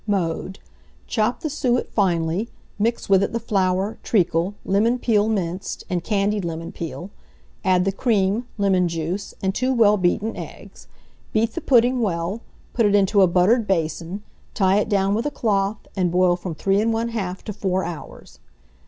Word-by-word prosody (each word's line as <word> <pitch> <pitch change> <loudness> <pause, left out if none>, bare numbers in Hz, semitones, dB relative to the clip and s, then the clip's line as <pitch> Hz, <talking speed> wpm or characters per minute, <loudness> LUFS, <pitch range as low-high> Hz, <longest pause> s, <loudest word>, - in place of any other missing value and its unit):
Mode. 190 -1 -1 0.5
Chop 220 +5 0
the 315 - -2
suet 250 -4 0
finely; 180 +1 +1 0.3
mix 230 +3 0
with 195 -1 +5
it 200 - -1
the 230 - 0
flour, 195 -2 0
treacle, 180 -1 +1
lemon 220 +5 +2
peel 215 -4 +2
minced, 185 -3 -3
and 175 -2 -1
candied 205 +1 0
lemon 165 -1 -5
peel; 175 +3 -7 0.5
add 185 -1 +3
the 195 - +2
cream, 210 +1 +1
lemon 190 -3 +2
juice, 170 +4 -4
and 190 0 +1
2 255 +5 0
well 210 -3 +5
beaten 195 +4 0
eggs; - - -10 0.5
beat 225 +1 +1
the 335 - -4
pudding 250 -2 +3
well, 185 +1 -2 0.3
put 230 -3 +3
it 205 - +3
into 200 0 +4
a 190 - +6
buttered 200 +6 +3
basin, 170 +2 -2 0.3
tie 195 +1 +3
it 210 - -1
down 195 -1 +2
with 230 +7 0
a - - +1
cloth, 205 -5 -1
and 180 -3 +1
boil 180 0 +3
from 175 -2 -6
3 195 +5 +1
1/2 225 -3 -1
to 210 - -5
4 190 -2 -1
hours. 165 -2 -9
195 Hz, 165 wpm, -22 LUFS, 180-220 Hz, 0.5 s, a